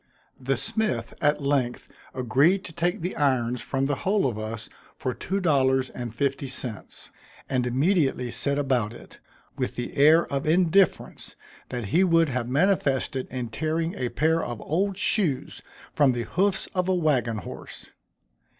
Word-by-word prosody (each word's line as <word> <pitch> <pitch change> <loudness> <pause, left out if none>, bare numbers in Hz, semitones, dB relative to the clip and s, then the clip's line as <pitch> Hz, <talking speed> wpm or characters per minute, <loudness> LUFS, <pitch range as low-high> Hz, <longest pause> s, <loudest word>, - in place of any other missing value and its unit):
The 135 +1 -1
smith 220 -1 -2
at 150 -1 +2
length 135 -4 0 0.3
agreed 140 - +3
to 175 - -9
take 175 +2 -1
the 180 +3 -3
irons 125 -4 +1
from 135 0 -1
the 140 0 -1
whole 200 +6 +1
of 115 -5 -1
us 110 +1 -5 0.3
for 130 - -2
two 195 +9 -3
dollars 130 -6 +2
and 120 -2 -6
fifty 135 +2 -1
cents, 125 -4 -6 0.4
and 125 -2 0
immediately 135 -2 +1
set 140 +4 -1
about 130 -6 0
it, - - -14 0.4
with - - -2
the 120 - -5
air 155 +4 +6
of 140 +2 -1
indifference 180 +2 +2 0.3
that 120 -5 -4
he 180 - +5
would 165 -3 +4
have 125 -2 -2
manifested 140 -4 +1
in 125 -3 -4
tearing 160 +7 -1
a 125 - -2
pair 160 +5 +1
of 120 -2 -5
old 190 +5 -1
shoes 180 -10 0 0.3
from 140 -3 +4
the 120 -1 -2
hoofs 195 - +1
of 180 0 0
a 185 - +3
wagon 130 -10 +1
horse. 105 - -9
140 Hz, 160 wpm, -26 LUFS, 125-165 Hz, 0.4 s, air